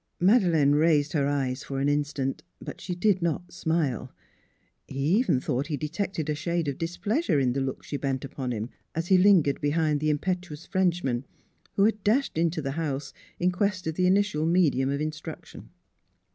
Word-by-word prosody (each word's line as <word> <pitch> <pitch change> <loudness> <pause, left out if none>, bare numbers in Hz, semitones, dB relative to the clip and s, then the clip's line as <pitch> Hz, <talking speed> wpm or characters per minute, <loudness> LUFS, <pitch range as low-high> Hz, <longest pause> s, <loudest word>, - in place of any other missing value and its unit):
Madeleine 175 - +4
raised 150 -1 +3
her 140 -3 +2
eyes 135 -2 -1
for 135 -1 -4
an 140 - +1
instant. 145 -2 -1 0.2
But - - -8
she 180 -1 -4
did 190 0 +2
not 170 +1 -2
smile. 160 -7 -1 0.8
He 135 - -8
even 165 - +2
thought 130 +3 -2
he 150 -3 -2
detected 160 +2 -3
a 150 - +1
shade 170 +2 -2
of 140 - -3
displeasure 175 - 0
in 125 -2 +2
the 135 - -1
look 135 -1 -3
she 145 - -4
bent 135 -1 -2
upon 130 -1 -4
him, 115 +1 -4 0.2
as 165 +2 -2
he 190 - +6
lingered 180 -8 +4
behind 150 0 +1
the 155 +1 0
impetuous 175 0 -2
Frenchman, 170 -9 0 0.5
who 195 - +2
had 215 -1 +2
dashed 250 +7 +2
into 165 -2 0
the 135 - -2
house 145 -3 -3 0.3
in 180 +1 +2
quest 185 0 -1
of 160 - -1
the 180 +3 +2
initial 190 -5 +2
medium 155 -7 +3
of 140 +1 -1
in 155 0 -1
struction. 155 +1 -10
155 Hz, 185 wpm, -27 LUFS, 140-180 Hz, 0.8 s, he